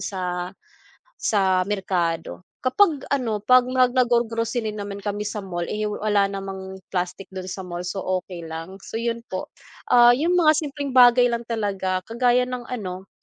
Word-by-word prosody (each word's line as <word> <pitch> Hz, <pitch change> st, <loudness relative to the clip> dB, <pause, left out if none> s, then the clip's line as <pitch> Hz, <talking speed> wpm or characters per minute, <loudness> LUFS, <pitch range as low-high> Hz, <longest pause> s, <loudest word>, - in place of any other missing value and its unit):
sa 180 Hz, -2 st, -3 dB, 0.6 s
sa 190 Hz, -, +2 dB
merkado. 180 Hz, -4 st, -2 dB, 0.2 s
Kapag 290 Hz, +2 st, +2 dB
ano, 235 Hz, -7 st, -1 dB
'pag 255 Hz, +4 st, +5 dB
mag 255 Hz, -1 st, +3 dB
naggo-grocery 235 Hz, -2 st, +1 dB
naman 200 Hz, -1 st, -5 dB
kami 205 Hz, 0 st, -3 dB
sa 210 Hz, 0 st, -4 dB
mall, 175 Hz, -3 st, -4 dB
eh, 210 Hz, 0 st, -1 dB
wala 205 Hz, -1 st, +1 dB
namang 195 Hz, -1 st, -6 dB, 0.2 s
plastic 185 Hz, +1 st, -3 dB
dun 185 Hz, -1 st, -6 dB
sa 190 Hz, +1 st, -5 dB
mall 175 Hz, 0 st, -5 dB
so, 195 Hz, 0 st, -4 dB, 0.2 s
okey 180 Hz, -2 st, -9 dB
lang. 165 Hz, +3 st, -7 dB
So 225 Hz, -, -5 dB
'yun 230 Hz, 0 st, -2 dB
po, 185 Hz, -, -4 dB, 0.4 s
ah, 240 Hz, 0 st, +7 dB
'yung 320 Hz, +9 st, +2 dB
mga 320 Hz, -3 st, +6 dB
simpleng 285 Hz, -2 st, -4 dB
bagay 245 Hz, -1 st, +6 dB
lang 235 Hz, 0 st, -3 dB
talaga 195 Hz, -5 st, -1 dB
kagaya 245 Hz, +3 st, +2 dB
ng 250 Hz, -1 st, -5 dB
ano, 190 Hz, -6 st, -5 dB
210 Hz, 160 wpm, -23 LUFS, 190-245 Hz, 0.6 s, ah